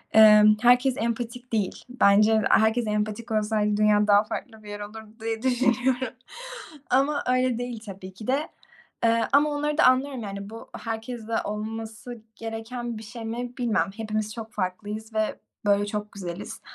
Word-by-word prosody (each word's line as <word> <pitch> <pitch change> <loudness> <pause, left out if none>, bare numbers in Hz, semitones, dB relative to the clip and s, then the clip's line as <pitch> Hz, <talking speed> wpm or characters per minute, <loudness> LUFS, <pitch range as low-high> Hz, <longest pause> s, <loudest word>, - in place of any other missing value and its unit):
Eee, 215 -1 +9 0.2
herkes 250 +2 +4
empatik 235 +2 -3
değil. 205 -4 -1
Bence 215 -2 +4
herkes 220 +1 +3
empatik 210 +2 -2
olsaydı 210 -1 +1
dünya 210 0 +4
daha 205 0 +6
farklı 220 0 -7
bir 210 - -11
yer 205 0 -6
olurdu 215 +1 -9
diye 225 0 -3
düşünüyorum 255 0 +1 0.8
ama 280 +3 +2
öyle 255 -1 +2
değil, 245 -2 -4
tabii 190 -1 -9
ki 210 +3 -10
de. 275 +4 +1 0.6
Eee, 230 0 +3
ama 290 +2 +5
onları 295 +1 -1
da - - +5
anlıyorum. 255 0 +3
Yani, 200 0 -6
bu 225 +1 -10
herkeste 225 0 -4
olması 220 +2 -6
gereken 225 +1 -5
bir 220 - -8
şey 230 +1 -8
mi, 245 +2 -5
bilmem. 240 -5 +1
Hepimiz 215 -1 -2
çok 225 -1 -8
farklıyız 210 +3 -4
ve 215 0 0 0.3
böyle 205 0 +3
çok 210 0 -4
güzeliz, 180 -1 -7
225 Hz, 155 wpm, -26 LUFS, 210-245 Hz, 0.8 s, Eee